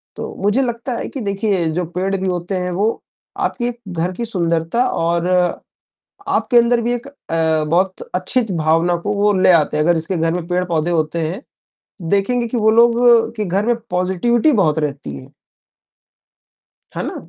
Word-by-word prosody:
तो - - -6
मुझे 210 +6 +2
लगता 240 0 -3
है - - -4
कि 275 - -6
देखिए 200 -3 -1
जो 180 +2 -1
पेड़ 195 +2 0
भी 190 0 -2
होते 180 +1 -2
हैं 180 0 -2
वो 200 +5 +1 0.5
आपके 240 0 -1 0.2
घर 175 0 -2
की 235 - -2
सुंदरता 170 +2 0
और 170 +1 0 1.0
आपके 245 - +1
अंदर 235 0 +3
भी 240 +1 -1
एक 245 +2 -6
अ, 160 - -1
बहुत 185 +3 0
अच्छी 185 +8 +2
च 205 - -5
भावना 165 +2 +2
को 205 +5 -3
वो 205 +1 +2
ले - - +5
आते 155 -2 +2
हैं, 150 - +1
अगर 175 - +4
जिसके 165 +3 -2
घर 165 0 0
में 175 -2 -4
पेड़-पौधे 175 -2 0
होते 160 0 0
हैं, 195 - -6 0.7
देखेंगे 235 +5 +1
कि 240 - -3
वो 220 -1 +3
लोग 235 +1 +5 0.4
के 210 - -1
घर 195 +3 0
में 240 - +2
पॉज़िटिविटी 190 - +1
बहुत 165 - +2
रहती 140 - -4
है। 65 - -13 1.6
है - - -2
ना? - - -5
185 Hz, 175 wpm, -18 LUFS, 170-225 Hz, 1.6 s, ले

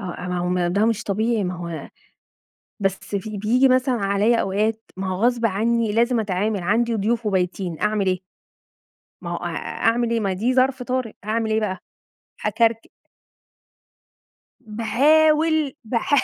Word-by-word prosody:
آه، 180 -2 -6
ما 180 0 -2
هو 180 - -1
م 180 0 0
ده 205 +3 +2
مش 225 -2 0
طبيعي، 220 +1 0
ما 180 0 -2
هو 170 -2 -6 0.9
بس 195 -1 0 0.2
في 210 +1 -4
بييجي 240 +6 +3
مثلًا 255 0 +2
عليَّ 205 +2 +2
أوقات 215 +3 0 0.2
ما 190 - -3
هو 185 +3 -2
غصب 240 -1 +2
عني 225 +2 +1
لازم 235 +2 +2
أتعامل، 205 +1 -1
عندي 230 +4 +1
ضيوف 225 +3 0
وبايتين 185 -3 -1
أعمل 210 -2 +1
ايه؟ 185 -1 +1 1.0
ما - - -5
هو - - -2
أ - - -5 0.4
أعمل 235 0 +1
إيه؟ 230 - +1
ما 195 -3 0
دي 225 +7 0
ظرف 260 0 +2
طارئ 250 -3 -2
هاعمل 220 +1 -1
إيه 220 0 +2
بقى؟ 190 -3 -2 0.7
هاكركب 230 -1 +1 1.7
باحاول 300 +6 +2
باحا 230 +5 +1
220 Hz, 150 wpm, -22 LUFS, 195-235 Hz, 1.7 s, بييجي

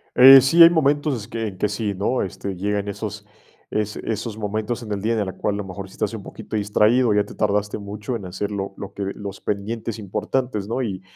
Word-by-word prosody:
Eh 135 +1 +10
sí, 150 +7 +4
hay 165 - +11
momentos 145 -3 +2
es 110 -4 -6
que 115 -1 -3
en 95 -3 -8
que 105 - 0
sí, 105 0 -2
¿no?, 105 +7 0
este, 95 +1 -4
llegan 100 +2 -1
esos 105 0 -6 0.4
es 105 -1 -2
esos 110 0 -4
momentos 110 +2 -3
en 105 - -8
el 100 -1 -2
día 115 +3 +1
de 110 - +1
la 95 - -4
cual, 105 - -1
a - - -3
lo - - -3
mejor, 95 +1 -7
si 95 - -17
estás 105 +1 -2
un 110 - -5
poquito 110 - -6
distraído, 105 +4 +3
o - - +3
ya 105 0 +3
te - - -11
tardaste 105 0 0
mucho 105 +4 -5
en 100 - -10
hacer 95 +3 -4
lo 100 -1 -4
lo 100 0 -8
que 100 - -4
los 100 -1 -7
pendientes 110 +2 -3
importantes, 105 +2 -2
¿no?, 120 +4 -1
y 100 -6 -3
105 Hz, 240 wpm, -22 LUFS, 100-115 Hz, 0.4 s, hay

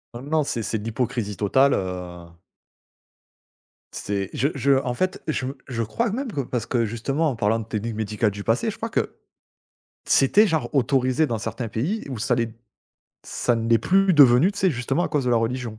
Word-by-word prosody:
Heu, 120 - -6
non, 155 +2 0
c'est 120 -4 -3
c'est, 110 - -2
de 105 - -9
l'hypocrisie 115 -2 -2
totale, 130 +7 +3
heu 90 -2 -4 1.7
C'est 100 -2 -3
je 135 - +1
je 140 +1 +1
en 125 -1 -2
fait 185 +4 -2
je 145 -4 -1 0.2
je 115 -3 -2
crois 230 - -1
même 250 0 -3
que 140 - -2
parce 120 -3 -3
que 120 -2 0
justement 135 +8 -1
en 130 - -3
parlant 110 +1 +1
de 110 - -6
technique 110 +1 -4
médicale 105 0 -1
du 100 0 -7
passé, - - +1
je - - -11
crois - - -4
que - - -2 0.9
c'était 205 +11 +4
genre 160 -3 -1
autorisé, 130 +1 +2
dans 115 -3 -2
certains 115 +1 -5
pays. 155 - -2
Où 125 -5 -5
ça 120 +2 +1
l'est 115 -2 -2 0.7
ça 120 - -1
ne 115 0 -2
l'est 115 -1 +5
plus 190 - +3
devenu, 145 +4 +6
tu 200 - -8
sais? 190 -2 +3
Justement 135 +5 -1
à - - -2
cause 145 -3 0
de 125 - +1
la 120 - +4
religion. 115 -1 -2
120 Hz, 200 wpm, -23 LUFS, 110-140 Hz, 1.7 s, devenu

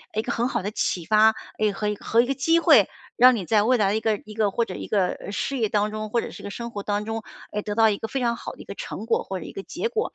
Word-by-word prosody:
一 215 - +2
个 240 - -4
很 240 +1 0
好 260 - -1
的 205 - -3
启 180 -4 -1
发， 220 +3 +5 0.2
诶， 215 -1 +2
和 210 +1 -3
一 210 - -1
和 225 +3 +2
一 - - 0
个 270 - 0
机 330 +5 +3
会， - - +6 0.3
让 255 0 +7
你 200 -5 -4
在 210 +2 +3
未 250 +3 +3
来 205 -3 +2
的 205 - +1
一 - - 0
个 220 -1 +1
一 215 - -10
个 210 -2 +1
或 235 +3 0
者 - - -7
一 - - -6
个， 195 -4 +2
呃， - - -6
事 275 +6 -2
业 220 -4 +1
当 210 0 +1
中， 215 0 -4
或 235 +2 +1
者 - - -6
是 - - -11
个 200 - -5
生 235 +4 -6
活 205 -3 -5
当 205 0 -1
中， 225 0 -4 0.3
诶， 210 - -2
得 205 0 -4
到 225 0 +5
一 205 - 0
个 225 - -5
非 270 - -3
常 235 -2 +1
好 - - -7
的 - - -17
一 - - -12
个 - - -8
成 220 - -6
果， - - +1
或 190 -1 -5
者 - - -8
一 - - -8
个 195 - -7
结 375 - -3
果。 450 -1 -2
215 Hz, 360 characters per minute, -24 LUFS, 205-235 Hz, 0.3 s, 让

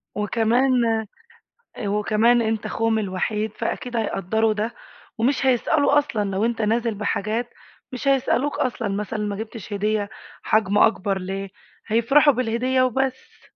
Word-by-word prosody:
وكمان، 230 +5 +2 1.1
أ 210 - -4
وكمان 215 +3 +3
أنت 220 -1 -1
اخوهم 225 -1 0
الوحيد 210 +2 -2
فأكيد 240 +1 -3
هيقدّروا 220 +1 0
ده 215 +3 -3 0.4
ومش 260 +3 +1
هيسألوا 285 +3 +3
أصلًا 225 -8 -1
لو 195 +3 0
أنت 230 -1 -1
نازل 225 +1 +1
بحاجات 215 +3 -2 0.4
مش 255 +2 -3
هيسألوك 275 +2 +1
أصلًا 250 -5 -1
مثلًا، 210 +2 -3
ما 205 -1 -2
جِبتش 220 -1 -8
هدية 205 0 0 0.3
حجم 205 -2 +2
أكبر 200 -3 +2
ليه، 195 +1 -5 0.4
هيفرَحوا 250 +7 +4
بالهدية 255 +2 0
وبس. 260 +1 -2
225 Hz, 130 wpm, -23 LUFS, 210-245 Hz, 1.1 s, هيفرَحوا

